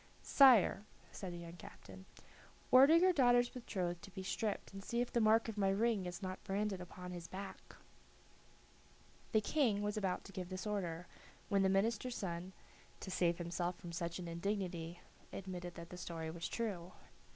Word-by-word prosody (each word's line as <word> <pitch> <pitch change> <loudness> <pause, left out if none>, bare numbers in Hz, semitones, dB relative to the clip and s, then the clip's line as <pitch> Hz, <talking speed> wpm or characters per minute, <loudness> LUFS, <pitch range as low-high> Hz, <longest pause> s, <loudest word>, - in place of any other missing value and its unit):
"Sire," 240 -7 +6 0.3
said 190 -3 -6
the 175 - -6
young 170 0 -9
captain, 95 - -12 0.7
"order 275 +5 +8
your 365 +2 +5
daughter's 245 -4 +5
betrothed 180 -8 -3
to 200 - -10
be 190 0 -7
stripped, 205 +1 -2
and 195 0 -7
see 235 +4 -2
if 245 - -1
the 235 - +3
mark 220 +1 +4
of 220 -2 -4
my 195 -1 +3
ring 205 -1 +1
is 175 +3 -6
not 185 0 -5
branded 195 -1 -1
upon 180 0 -8
his 175 -1 -7
back." 195 +2 -8 1.6
The 220 - +4
King 220 -5 +1
was 210 +1 -1
about 190 -3 -1
to 195 - -11
give 180 -2 -5
this 185 +1 -5
order, 180 -5 -2 0.4
when 200 -2 +3
the 190 - +4
minister's 225 +5 +1
son, 180 0 -4 0.5
to 190 - -6
save 170 -2 +2
himself 175 +1 -2
from 175 - -8
such 170 0 -3
an 180 -2 -6
indignity, 175 -1 -3 0.3
admitted 180 -2 -6
that 170 0 -9
the 180 - -7
story 165 -2 -5
was 170 +1 -4
true. 185 -6 -3
190 Hz, 175 wpm, -37 LUFS, 175-215 Hz, 1.6 s, order